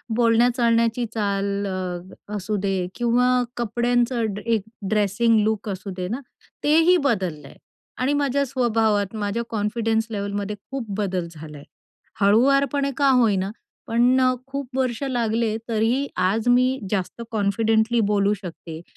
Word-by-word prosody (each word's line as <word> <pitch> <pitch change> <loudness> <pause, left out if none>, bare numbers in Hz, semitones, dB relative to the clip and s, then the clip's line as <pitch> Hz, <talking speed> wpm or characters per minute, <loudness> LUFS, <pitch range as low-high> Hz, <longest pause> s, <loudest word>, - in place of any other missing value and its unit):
बोलण्या-चालण्याची 235 0 +3
चाल 200 -1 -1
अ, 185 +1 -6
असू 205 +2 -2
दे 190 -3 -1
किंवा 245 +1 +2 0.3
कपड्यांचं 240 +1 +1 0.2
एक 225 -3 +1 0.3
ड्रेसिंग 215 +2 +2
लूक 215 -1 -1
असू 190 +1 -5
दे 180 0 -3
ना. 240 +7 -3 0.4
तेही 330 +4 +5
बदललंय 190 - -2 0.4
आणि 260 +3 +1
माझ्या 280 -1 +1
स्वभावात 225 -5 +1
माझ्या 210 +2 -2
कॉन्फिडन्स 225 +1 0
लेव्हलमध्ये 205 0 -3 0.2
खूप 270 -4 -3
बदल 185 -4 -1
झालाय. 150 -2 -10 0.6
हळुवारपणे 275 +6 +3
का 280 -1 +4
होईना 205 -7 +3 0.4
पण 240 +3 +3 0.3
खूप 275 0 -5
वर्ष 255 -2 -1
लागले, 230 -4 0
तरीही 230 +5 +1
आज 215 +6 +1
मी 255 +2 +3
जास्त 200 +3 -2
कॉन्फिडेंटली 220 +2 +1
बोलू 200 0 +2
शकते, 170 -4 -8
225 Hz, 120 wpm, -23 LUFS, 200-245 Hz, 0.6 s, तेही